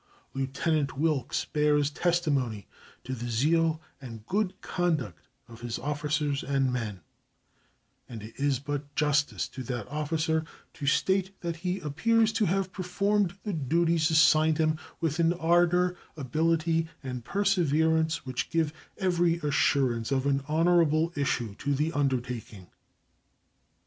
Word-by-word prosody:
Lieutenant 135 +1 -1
Wilkes 150 -4 0
bears 150 -1 +2
testimony 145 - 0 0.4
to 130 - -5
the 120 -1 -5
zeal 160 +7 +2 0.2
and 115 -5 -9
good 200 - -1
conduct 175 -7 -2 0.2
of 115 -1 -13
his 120 -1 -3
officers 145 0 -1
and 135 -2 0
men, 105 -7 -4 1.1
and 115 -4 -8
it 110 +1 -10
is 140 -1 +2
but 145 +1 -5
justice 150 -1 +1
to 130 - -8
that 120 -4 -4
officer 155 +1 0 0.3
to 145 - -6
state 190 +5 +1
that 170 -1 -3
he 180 +3 -2
appears 220 +9 +2
to 220 -1 +2
have 190 +1 -1
performed 195 +1 0
the 210 - -3
duties 165 +2 +1
assigned 155 0 +5
him 155 -1 +1 0.2
with 165 -1 -1
an 165 0 +3
ardor, 175 +1 +2 0.2
ability, 160 +4 +1 0.2
and 125 -2 -5
perseverance 160 - +1
which 130 -1 -3
give 160 -2 0 0.2
every 175 -3 +2
assurance 135 -5 +1
of 135 0 +1
an 140 -1 +1
honorable 165 0 +3
issue 125 -7 -1
to 140 0 0
the 155 +4 0
undertaking. 125 -8 -3
155 Hz, 130 wpm, -28 LUFS, 135-170 Hz, 1.1 s, assigned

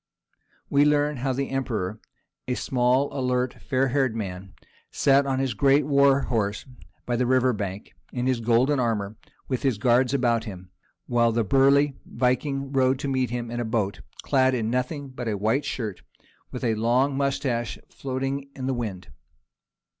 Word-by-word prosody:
We 140 0 +4
learn 150 0 +2
how 130 +2 -1
the 135 +1 -2
Emperor, 110 -7 -2 0.5
a 125 - 0
small 130 +3 +1
alert 125 -1 -1
fair 135 0 0
haired 130 -3 +1
man, 95 -3 -6 0.3
sat 140 0 +3
on 135 -1 0
his 135 -2 0
great 135 +6 +3
war 140 -1 +4
horse 105 -5 -1 0.4
by 120 - -1
the 125 +1 +1
river 130 0 +3
bank, 100 -1 -5 0.2
in 125 -1 -2
his 130 -2 +1
golden 120 +5 +2
armour 110 -4 -1 0.3
with 130 -2 -2
his 130 -6 +1
guards 125 +3 +3
about 120 -4 +1
him, 90 -4 -9 0.3
while 120 -1 +2
the 115 0 +1
burly 135 +4 +3
Viking 135 +3 -1
rowed 130 -1 +2
to 140 - -4
meet 130 -2 0
him 120 -1 -4
in 120 - -3
a - - 0
boat, 110 -4 -1 0.2
clad 130 -1 +3
in 115 -2 -1
nothing 135 +3 -2
but 130 -2 -6
a 105 -2 -1
white 110 +8 0
shirt, 110 -7 -4
and - - -28 0.4
with - - -7
his 110 -3 0
long 125 +5 +2
moustache 135 -4 -1
floating 135 +1 -3
in 130 - -5
the 135 - 0
wind. 105 -7 -5
125 Hz, 170 wpm, -25 LUFS, 115-135 Hz, 0.5 s, We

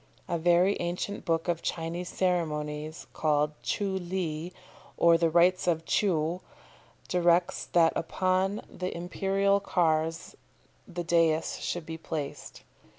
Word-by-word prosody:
A 170 - -1
very 175 +4 +4
ancient 175 +4 -3
book 165 -1 0
of 170 -2 0
Chinese 170 +2 -3
ceremonies, 155 -4 -2
called 150 -1 +1
"Tcheou 190 -3 -2
Li, 175 -2 -3 0.5
or 170 0 +6
The 165 0 +3
Rites 180 +3 +3
of 165 -2 +1
Tcheou," 175 -3 +1 0.7
directs 175 -1 +2
that 165 -2 +4
upon 185 +4 0
the 180 -1 -5
imperial 195 +3 +1
cars 165 -4 0 0.5
the 175 -2 -5
dais 165 -2 +2
should 175 -2 -3
be 160 0 -6
placed. 150 -3 -6
170 Hz, 120 wpm, -28 LUFS, 160-180 Hz, 0.7 s, or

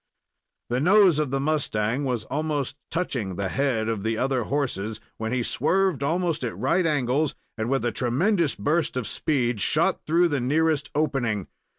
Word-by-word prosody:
The 125 - +1
nose 185 0 +5
of 150 -3 0
the 135 +1 -1
mustang 135 -4 0
was 125 -4 -1
almost 145 -1 -2
touching 125 - -2
the 100 0 -2
head 125 -4 0
of 110 -3 -1
the 110 +1 -1
other 130 -2 0
horses, 110 -7 -2 0.2
when 110 0 -3
he 125 -1 0
swerved 190 +1 +1
almost 165 +1 0
at 115 -8 -3
right 165 - +2
angles, 145 0 +1 0.2
and, 110 0 -3
with 135 -2 0
a 120 - +1
tremendous 155 - +1
burst 155 -2 0
of 125 - -2
speed, 120 -7 -1
shot 165 - +2
through 170 +2 +3
the 145 -3 0
nearest 155 +4 +1
"opening." 125 - 0
135 Hz, 170 wpm, -25 LUFS, 120-155 Hz, 0.2 s, nose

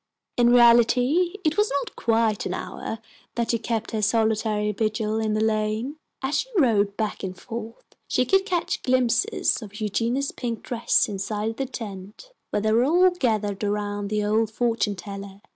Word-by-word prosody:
In 240 -1 +4
reality 245 - +5
it 310 +1 +1
was 420 +1 +3
not - - -7
quite 225 -2 +1
an - - -3
hour 225 - -5 0.4
that 235 -1 0
she 230 - 0
kept 225 0 -3
her 220 -2 -1
solitary 215 -1 +1
vigil 215 +1 -1
in 215 -1 0
the 215 - +1
lane. 220 +6 -1 0.3
As 265 +3 +1
she - - -3
rode 210 - +3
back 215 -2 -2
and 185 -2 -6
forth 230 -1 -8 0.2
she 255 - +1
could 385 +5 +3
catch 360 -4 -1
glimpses 255 - +1
of 210 0 -9
Eugenia's 235 +6 -1
pink 235 -3 -5
dress 240 -2 +1
inside 210 +2 -3
the 270 - -2
tent, 210 - -8 0.2
where - - -1
they 215 - +2
were 230 +2 +4
all 355 +6 +4
gathered 215 - -1
around 205 0 -2
the 210 0 0
old 215 +1 +2
fortune 225 -2 0
teller. 195 +1 -8
225 Hz, 170 wpm, -24 LUFS, 210-245 Hz, 0.4 s, reality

